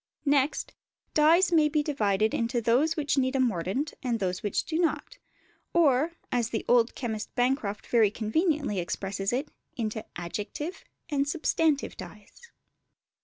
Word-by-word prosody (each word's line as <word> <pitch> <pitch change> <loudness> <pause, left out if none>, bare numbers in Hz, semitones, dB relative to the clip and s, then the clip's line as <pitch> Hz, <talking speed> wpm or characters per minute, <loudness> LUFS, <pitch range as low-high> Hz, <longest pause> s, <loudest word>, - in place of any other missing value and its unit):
Next, 280 0 +1 0.4
dyes 330 +5 +5
may 310 -3 +4
be 300 0 +1
divided 215 -7 +1
into 235 +1 0
those 255 +9 +2
which 290 -2 +1
need 260 0 0
a - - +2
mordant 235 - 0
and 240 -4 -1
those 185 -2 -2
which 205 - -1
do 320 0 -2
not; 355 +9 -1 0.6
or, 310 -1 +3 0.2
as 240 -2 0
the 225 - -3
old 240 -1 +3
chemist 220 -4 -4
Bancroft 245 -5 0
very 225 -4 +4
conveniently 235 - 0
expresses 195 +3 -3
it, 270 +5 -2 0.3
into 220 -2 -3
adjective 210 - -5 0.3
and 280 -2 0
substantive 310 -2 +1
dyes. 210 - -12
255 Hz, 140 wpm, -28 LUFS, 215-300 Hz, 0.6 s, dyes